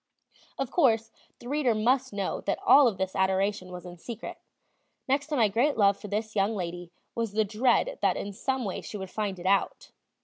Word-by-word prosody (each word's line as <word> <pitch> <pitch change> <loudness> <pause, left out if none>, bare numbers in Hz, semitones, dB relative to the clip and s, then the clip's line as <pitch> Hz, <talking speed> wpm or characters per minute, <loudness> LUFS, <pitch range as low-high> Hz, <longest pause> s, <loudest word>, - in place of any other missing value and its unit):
Of 270 -2 -3
course, 225 -8 +2 0.3
the 240 - -12
reader 270 -4 +1
must 255 +4 +1
know 200 -2 -3
that 195 - +1
all 280 -2 +8
of 210 -5 -1
this 190 0 -3
adoration 190 0 0
was 180 0 -8
in 175 0 -9
secret; 230 +4 -7 0.7
next 280 +2 +1
to 305 - -2
my 230 -5 +4
great 240 +8 +1
love 200 -2 +5
for 210 - -10
this 215 +2 -3
young 205 +2 +1
lady 175 -2 -5 0.2
was 230 -3 -2
the 215 0 +2
dread 255 - +1
that - - +2
in 200 - -5
some 260 +4 -2
way 195 - -3
she 210 - -7
would 190 -2 -7
find 205 -3 -2
it 175 - -10
out. 195 +1 0
215 Hz, 205 wpm, -28 LUFS, 195-245 Hz, 0.7 s, all